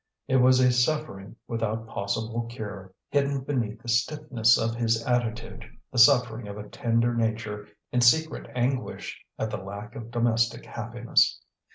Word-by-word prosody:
It 130 - +3
was 130 0 +5
a 125 -1 +5
suffering 125 -6 -1
without 115 -1 -2
possible 115 +2 -3
cure, 105 -5 -7 0.2
hidden 140 -1 +1
beneath 115 -5 -3
the - - -12
stiffness 120 -1 +2
of 115 0 0
his 115 -1 0
attitude, 115 -2 -2 0.3
the 125 - -1
suffering 115 -1 +5
of 100 0 -7
a 105 0 -8
tender 115 +2 0
nature 110 -2 -2 0.2
in 125 - +2
secret 155 +6 +3
anguish 125 +1 -2
at 110 - -2
the - - -2
lack 100 +5 -8
of 115 0 -8
domestic 115 -1 0
happiness. 120 +1 +1
115 Hz, 150 wpm, -26 LUFS, 110-125 Hz, 0.3 s, was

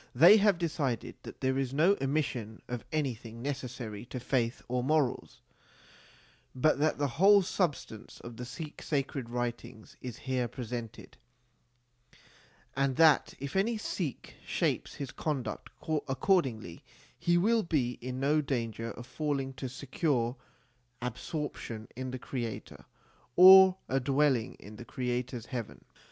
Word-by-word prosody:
They 170 - +9
have 205 -3 +4
decided 145 -8 -2
that - - -11
there 130 0 +1
is 135 0 -2
no 170 +7 +5
omission 135 -6 -2
of 125 -1 -4
anything 120 -6 -3
necessary 125 -6 -5
to 130 +1 -6
faith 125 -1 -1
or 125 0 -1
morals, 150 -2 0 1.1
but 140 +3 +3
that 155 +1 +2
the 145 - 0 0.2
whole 200 0 +7
substance 160 - -3
of 120 0 -9
the 125 - -7
Sikh 150 +5 -8
sacred 135 -4 -2
writings 120 -2 -5
is 125 -3 -6
here 130 -2 -1
pre 125 0 -7
sented, 115 -1 -6 1.6
and 135 -1 +1
that 160 -2 +5
if 140 +4 -6
any 220 +4 +2
Sikh 175 - -4
shapes - - -1
his 140 -4 -5
conduct 135 -8 -3 0.4
accordingly, 130 - 0 0.4
he 175 0 +3
will 225 +6 +3
be 140 - -1
in 130 +1 -4
no 150 +3 +2
danger 115 -5 -3
of 120 - -9
failing 140 -2 -2
to 130 0 -5
secure 130 -2 -1 0.6
absorption 120 -2 -5
in 130 +1 -4
the 130 - -4
Creator 120 -3 -6 0.5
or 190 +1 +9
a 135 - +1
dwelling 135 -2 +1
in 105 +2 -12
the 120 - -9
Creator 125 0 -3
s 115 - -9
heaven. 120 -4 -6
130 Hz, 140 wpm, -30 LUFS, 120-150 Hz, 1.6 s, They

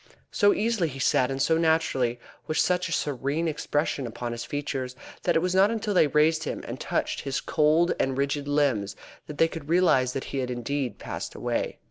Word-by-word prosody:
So 205 0 +4
easily 220 -5 +1
he 135 - -8
sat 130 -1 +2
and 135 0 -3
so 160 +4 +2
naturally, 135 -7 +1 0.3
with 155 - -2
such 180 +1 +2
a - - -7
serene 145 +2 -1
expression 145 -3 -1
upon 120 +1 -5
his 120 0 -4
features, 135 -3 -4 0.3
that - - +1
it 165 - +3
was 180 0 0
not 190 +2 +5
until 220 -2 -2
they 170 -5 +5
raised 155 +2 +3
him, - - -4
and - - -6
touched - - -2
his 135 +1 -2
cold 155 +3 +2
and 135 0 0
rigid 140 +1 -1
limbs, 140 -9 +1 0.3
that 150 - -8
they 165 - +5
could 160 -3 -8
realise 150 -8 +3
that 135 - -3
he 135 - -1
had 125 -1 -2
indeed 125 0 -3
passed - - -6
away. - - -2
145 Hz, 200 wpm, -26 LUFS, 130-165 Hz, 0.3 s, not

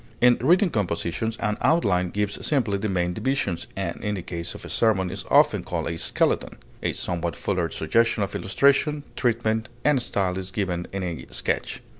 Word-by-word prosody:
In 125 0 +5
written 175 +7 +4
composition 95 +1 -1
an 105 -2 -1
outline 90 - +2
gives 100 +2 -2
simply 115 -9 +1
the 105 +1 -1
main 90 -2 0
divisions, 115 -6 -1
and - - -4
in 105 0 -1
the 95 - -5
case 85 0 -5
of - - -9
a - - -7
sermon 95 -5 +2
is 95 - -5
often - - +4
called - - -3
a 85 - -3
skeleton; - - +1 0.2
a - - 0
somewhat 85 -2 -2
fuller 90 -2 -1
suggestion 110 +6 +1
of 100 - -4
illustration, 140 +8 +2
treatment, 115 -1 0 0.2
and 145 -3 +4
style 95 -5 0
is 95 0 -5
given 90 -3 -2
in 95 -1 -3
a 85 -3 -5
sketch. - - -2
100 Hz, 180 wpm, -25 LUFS, 90-115 Hz, 0.2 s, In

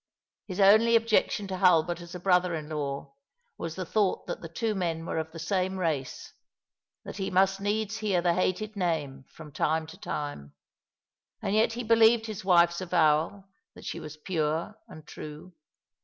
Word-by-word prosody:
His 185 -1 -6
only 220 +4 +6
objection 225 -2 +2
to 190 - -3
Hulbert 175 -2 +3
as 170 +1 -10
a - - -5
brother 180 -1 +2
in 155 -1 -6
law 140 -2 -4 0.4
was 165 -1 -5
the 185 - -4
thought 205 +2 0
that - - -5
the 165 - -8
two 220 +6 -1
men 165 -4 -2
were 160 - -2
of 160 0 -5
the 165 - -10
same 185 +2 -1
race 155 -7 -3 0.3
— - - -61
that - - -7
he 190 -1 -2
must 195 +1 +2
needs 215 +1 -1
hear 205 -5 +1
the 175 0 +2
hated 195 +4 -1
name 150 -8 -2
from 155 -2 -12
time 160 +3 0
to 170 +4 -13
time; 145 - -5 0.9
and - - -2
yet 220 +1 +3
he 245 +1 -4
believed 225 0 +5
his 215 -4 -6
wife's 170 -1 +4
avowal 170 +2 +1 0.3
that - - -13
she - - -4
was 155 0 -9
pure 160 +2 -2
and 155 -1 -12
true. 150 +4 -10
180 Hz, 180 wpm, -28 LUFS, 160-200 Hz, 0.9 s, only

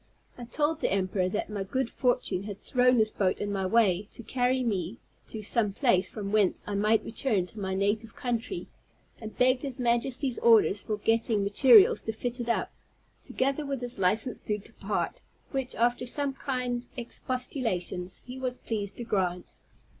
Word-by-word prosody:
I 245 - -8
told 300 +5 0
the - - 0
emperor 185 -1 0
that 210 - -2
my 210 -2 -4
good 260 +6 -1
fortune 235 -7 0
had 205 -1 -6
thrown 250 0 +3
this 215 -1 +3
boat 185 -2 0
in 205 0 -3
my 190 -2 -1
way, 205 -3 +3
to 235 - -8
carry 255 +2 +1
me 200 -2 -2 0.3
to 215 -1 -7
some 210 -1 +1
place 190 -7 +2
from 200 -2 -5
whence 210 -3 +2
I 205 - -4
might 210 +2 +2
return 240 +1 -1
into 185 +3 -2
my 190 -1 -2
native 205 +3 -1
country, 245 - -3 0.5
and 220 -1 -9
begged 255 0 +3
his 270 -3 -5
Majesty's 245 +1 0
orders 220 -3 +5
for 215 - -3
getting 225 -1 +1
materials 275 - +6
to 220 - -4
fit 245 +2 -4
it 240 -1 -3
up, 235 - 0 0.5
together 275 +3 -1
with 275 -2 -3
his 245 -3 -4
licence 215 +7 +2
to 210 - -2
depart, 205 - -4 0.3
which, 265 -2 -3
after 240 +1 +1
some 280 +2 -1
kind 250 -2 -3
expostulations, 235 -7 -3
he 250 +1 -8
was 255 -1 -2
pleased 205 -3 -4
to 240 - -5
grant. 185 -6 -1
230 Hz, 175 wpm, -28 LUFS, 200-250 Hz, 0.5 s, materials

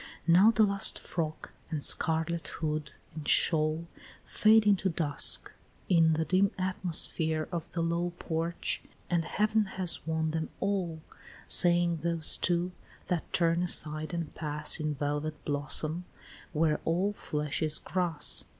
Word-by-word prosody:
Now 180 +6 +6
the 225 -1 +3
last 200 -1 +3
frock, 160 -2 -5 0.2
and 155 -4 -4
scarlet 160 +1 +1
hood, 150 -2 -4 0.2
and 155 -1 -8
shawl 155 0 +3 0.4
Fade 215 0 +4
into 195 -2 +2
dusk, 155 -4 +1 0.4
in 165 -3 +4
the 160 +1 -1
dim 190 +3 +2
atmosphere 165 -4 0
Of 170 -2 -5
the 170 - -1
low 170 +1 -1
porch, 165 +1 -2 0.3
and 170 -1 +1
heav'n 215 +2 +1
has 180 -3 0
won 160 -1 -1
them 160 0 -3
all, 180 -5 -2 0.4
Saying 175 -1 +4
those 165 0 +2
two, 175 0 0 0.4
that 175 -3 -2
turn 170 0 +1
aside 155 -3 0
and 170 -3 -4
pass, 150 -1 -2
In 155 -1 -2
velvet 150 +2 -4
blossom, 155 +4 -1 0.5
where 155 -1 +1
all 185 +5 0
flesh 150 -5 -4
is 155 -1 +2
grass. 175 -5 +1
165 Hz, 135 wpm, -29 LUFS, 155-180 Hz, 0.5 s, Now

